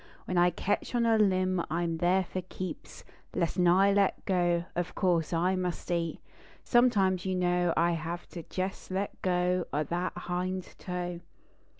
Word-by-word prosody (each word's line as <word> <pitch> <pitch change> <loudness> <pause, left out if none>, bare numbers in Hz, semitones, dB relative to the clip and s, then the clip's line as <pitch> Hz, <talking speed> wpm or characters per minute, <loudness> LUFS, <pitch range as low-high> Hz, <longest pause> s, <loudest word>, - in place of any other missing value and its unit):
When 185 - -3
I 175 0 +5
ketch 205 +7 -2
on 235 -1 +2
a 225 -1 +4
limb 185 -3 +2
I 170 +2 0
m 165 -1 -1
there 180 +3 +3
for 185 +1 -4
keeps 185 -1 -7 0.3
I,esn 175 +1 +1
I 195 +2 +5
let 200 -1 +1
go. 175 -2 +1
Of 175 +1 -2
course 170 -4 +1
I 180 +3 +2
must 180 -1 -3
eat. 170 -2 -1 0.4
Sometimes, 200 -7 +3
you 190 -1 -1
know, 175 -1 +2
I 170 +1 +3
have 170 +1 -4
to 170 - -7
jes 190 +1 -3
let 190 +2 -3
go 180 -1 +1
() - - -34
that 170 +5 -1
hind 180 +1 -3
toe. 180 -1 -4
180 Hz, 170 wpm, -29 LUFS, 175-185 Hz, 0.4 s, I